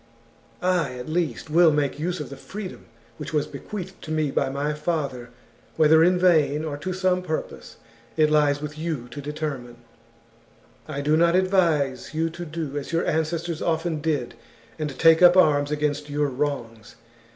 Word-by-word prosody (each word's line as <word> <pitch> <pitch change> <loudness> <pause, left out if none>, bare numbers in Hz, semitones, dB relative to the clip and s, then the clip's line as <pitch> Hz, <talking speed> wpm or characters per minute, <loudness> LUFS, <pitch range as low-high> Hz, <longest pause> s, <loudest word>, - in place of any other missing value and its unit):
I, 180 -7 +1
at 125 0 -7
least, 155 -3 -2
will 170 0 +6
make 145 -1 -1
use 175 +3 -2
of - - -6
the - - -6
freedom 200 -2 -8 0.3
which 150 0 -7
was 150 -2 +1
bequeathed 190 -2 -8
to - - -10
me 155 -2 0
by - - 0
my 140 +2 -2
father, 145 -6 -3 0.5
whether 160 +1 +5
in 180 +2 +4
vain 160 -4 +3
or 150 -2 -3
to 150 +6 -4
some 185 0 +1
purpose 160 -3 -5 0.4
it 155 -1 +4
lies 145 -1 +2
with 150 +1 -6
you 155 -7 -3
to 135 +4 -7
determine. 140 -4 -5 0.6
" 115 0 -32 0.3
I 145 -2 -4
do 150 +2 +2
not 170 +2 +4
advise 165 -8 +1
you 165 +1 0
to 175 +1 -7
do 150 -3 -4
as 140 - -8
your 165 +1 0
ancestors 160 +1 -1
often 160 -1 -1
did, 145 -6 -1 0.5
and 155 -1 -2
take 165 0 +6
up 180 0 +7
arms 145 -5 +4
against 150 0 -2
your 145 0 0
wrongs. 125 -5 -4
155 Hz, 175 wpm, -24 LUFS, 145-170 Hz, 0.6 s, up